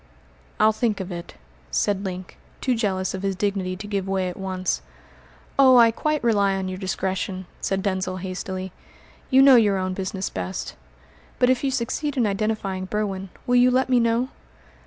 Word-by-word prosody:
"I'll 215 +1 +6
think 220 -1 -1
of 190 0 -5
it," 170 0 -7 0.3
said 200 -1 0
Link, 185 -1 -6 0.2
too 255 - +1
jealous 190 -5 -1
of 190 - -4
his 195 -1 -1
dignity 195 -2 -1
to 200 +3 -8
give 200 -2 -2
way 190 -1 0
at 180 - -7
once. 185 -1 -2 0.8
"Oh, 260 -2 +8
I 230 -1 +7
quite 305 +5 -1
rely 200 -4 +3
on 190 -1 -2
your 185 0 -5
discretion," 190 0 -2
said 195 0 -1
Denzil 185 -1 -1
hastily. 185 0 -5 0.6
"You 265 0 +6
know 270 -2 +8
your 205 -4 +4
own 185 0 -1
business 190 0 -3
best. 90 0 -4 0.6
But 250 0 +4
if 255 - 0
you 275 - +2
succeed 270 +3 -2
in 240 - +3
identifying 200 -2 -1
Berwin, 195 -1 -3 0.2
will 245 -1 +3
you 250 +1 +6
let 260 +1 +2
me 250 -1 +4
know?" 235 +2 +1
195 Hz, 180 wpm, -24 LUFS, 185-235 Hz, 0.8 s, Oh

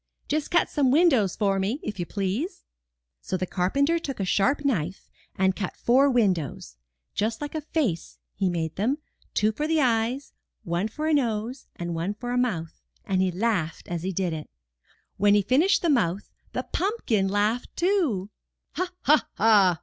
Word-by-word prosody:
'Just 300 0 -1
cut 345 - +3
some 280 -4 +1
windows 265 - +4
for 195 -2 +1
me, 210 +9 -1
if 205 -3 -5
you 175 - -2
please." 205 - -3 0.6
So 185 - -2
the 185 - -1
carpenter 280 - +1
took 275 -7 -5
a 195 - 0
sharp 230 - +1
knife 185 - -1 0.2
and 190 0 +2
cut 200 -4 -4
four 265 +4 +4
windows 185 - 0 0.2
— 60 +1 -54
^just 220 +2 0
like 295 -1 -5
a 315 - -2
face 275 - -2 0.2
he 190 -1 0
made 165 -2 -3
them, 240 +9 +1 0.4
two 215 +1 +3
for 295 +7 -2
eyes, 255 -3 +1 0.3
one 175 +4 -1
for 305 +8 -5
a 315 - +2
nose, 240 -2 -1
and 175 0 -4
one 170 +5 -2
for 245 +3 -5
a 245 - 0
mouth, 170 -10 -2 0.2
and 190 -1 +1
he 190 -1 +2
laughed 180 -4 -1
as 175 -2 -2
he 190 +3 -2
did 180 -2 -1
it. 155 -1 -6 0.7
When 205 +1 +5
he 205 - +3
finished 320 - +3
the - - +2
mouth, 205 - +1 0.2
the - - -2
pumpkin 340 - 0
laughed 210 +5 0
too. 325 - +1 0.5
''Ha, 365 0 0
ha, 300 +2 +4
ha!" 200 -6 +5
215 Hz, 180 wpm, -26 LUFS, 185-280 Hz, 0.7 s, When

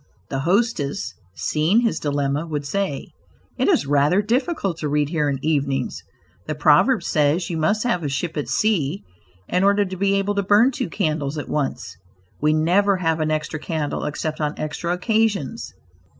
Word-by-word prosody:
The 135 - -1
hostess, 195 -6 0 0.2
seeing 160 +9 +2
his 230 -2 0
dilemma, 145 +1 -1
would 150 -3 -3
say: 190 -2 -2 0.5
"It - - +2
is - - +3
rather 145 +8 +3
difficult 235 - -1
to 150 -2 -3
read 145 0 +1
here 150 -3 0
evenings; 140 -4 -1 0.5
the 155 - -2
proverb 155 - +4
says 155 +3 +1
'you 165 - -2
must 205 +7 +1
have 210 -8 0
a 145 - -1
ship 160 +4 -3
at 150 - -3
sea 195 -5 0 0.4
in 180 +1 +1
order 200 +1 +4
to 185 0 -6
be 195 +1 +1
able 195 +1 0
to 200 - +1
burn 210 +6 +4
two 240 - -3
candles 155 -2 -1
at 145 - -5
once;' 135 - -3 0.4
we 150 +1 +3
never 180 +6 +3
have 165 -3 0
an 155 0 0
extra 155 0 -2
candle 155 -2 -3
except 155 +1 -3
on 150 0 -1
extra 155 +3 -3
occasions." 210 - 0
160 Hz, 170 wpm, -22 LUFS, 150-200 Hz, 0.5 s, proverb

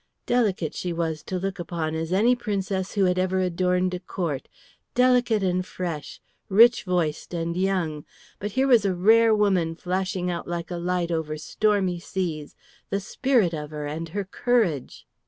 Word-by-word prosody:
Delicate 205 -10 +1
she 180 - -3
was 165 -2 -2
to 185 - -4
look 195 0 -3
upon 165 -2 -3
as 160 +1 -3
any 225 +7 +4
princess 195 -5 -2
who 200 -2 +3
had 180 0 +2
ever 185 0 +1
adorned 180 0 +1
a 180 - -3
court, 170 -6 -4 0.5
delicate 245 -4 +3
and 185 -1 +1
fresh, 170 -5 -5 0.3
rich 225 +4 +6
voiced 175 -2 -1
and 170 0 -2
young, 180 -5 -1 0.4
but 205 0 -4
here 265 +3 +2
was 245 -4 +6
the 195 -2 0
rare 220 +4 +5
woman 185 -6 +2
flashing 185 +1 -2
out 170 - -5
like 170 0 -4
a 175 - -3
light 175 0 -1
over 155 -2 -2
stormy 190 +1 0
seas, 170 -5 -4 0.3
the 195 - 0
spirit 220 -2 +1
of 150 -2 -5
her 150 -1 -5
and 160 +3 -4
her 200 +3 -3
courage! 195 - 0
180 Hz, 170 wpm, -25 LUFS, 170-200 Hz, 0.5 s, rich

